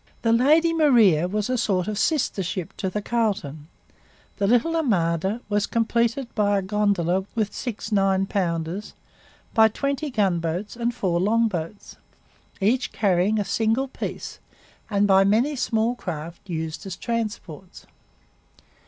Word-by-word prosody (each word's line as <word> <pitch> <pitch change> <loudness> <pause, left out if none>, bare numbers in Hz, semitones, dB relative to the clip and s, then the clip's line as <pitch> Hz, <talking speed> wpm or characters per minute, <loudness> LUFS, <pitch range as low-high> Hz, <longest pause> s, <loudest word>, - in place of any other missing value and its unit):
The 230 -1 +3
Lady 310 +8 +4
Maria 230 - +4
was 210 +2 -2
a 255 -1 0
sort 190 -5 0
of 215 - -2
sister 250 -3 0
ship 185 +1 -4
to 190 - -2
the 210 +2 -4
Carleton. 195 -12 -2 0.7
The 200 - +1
little 245 +9 +2
armada 195 - 0
was 205 -1 0
completed 235 +2 0
by 205 -1 +2
a 195 - -1
'gondola' 190 -2 0
with 215 -3 -1
six 225 -3 -5
9 195 -1 +2
pounders, 175 0 -3 0.6
by 220 -1 +6
twenty 280 +6 -2
gunboats 185 -4 -1
and 235 0 -1
four 185 -7 -1
longboats, 205 -3 -1 0.6
each 240 +6 +1
carrying 195 +1 +1
a 205 - -1
single 225 +6 0
piece, 265 - -6 0.5
and 205 -1 +2
by 195 -1 +5
many 230 +9 +2
small 235 -2 0
craft 170 -3 -7
used 160 0 -4
as 185 - -5
transports. 205 -6 -5
205 Hz, 135 wpm, -24 LUFS, 185-235 Hz, 0.7 s, by